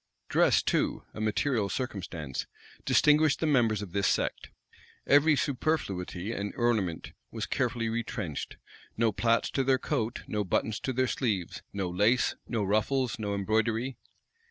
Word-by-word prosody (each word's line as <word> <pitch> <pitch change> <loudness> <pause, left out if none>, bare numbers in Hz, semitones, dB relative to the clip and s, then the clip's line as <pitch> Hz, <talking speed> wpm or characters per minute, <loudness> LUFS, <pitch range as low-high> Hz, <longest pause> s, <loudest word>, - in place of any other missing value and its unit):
Dress - - +4
too, - - 0
a 110 - -6
material 110 0 +1
circumstance, 90 - -4 0.4
distinguished 150 -1 +4
the - - 0
members 115 -8 +2
of 95 - -8
this 100 +1 +1
sect. - - -1 0.6
Every 145 +2 +5
superfluity 115 - -1
and 100 -2 -4
ornament 110 -9 0 0.2
was 110 0 -4
carefully 120 -3 -1
retrenched: 110 -8 -4 0.4
no 115 0 +3
plaits 115 +3 +1
to 135 - +1
their 130 0 +3
coat, 115 -1 -2
no 105 -1 -1
buttons 105 +3 0
to 130 - -2
their 130 +1 +2
sleeves; 105 -9 -2
no 100 -2 -2
lace, 105 +8 +2
no 115 -4 -1
ruffles, 115 +5 0
no 100 -2 -2
embroidery. 110 +5 0
110 Hz, 140 wpm, -29 LUFS, 100-130 Hz, 0.6 s, Every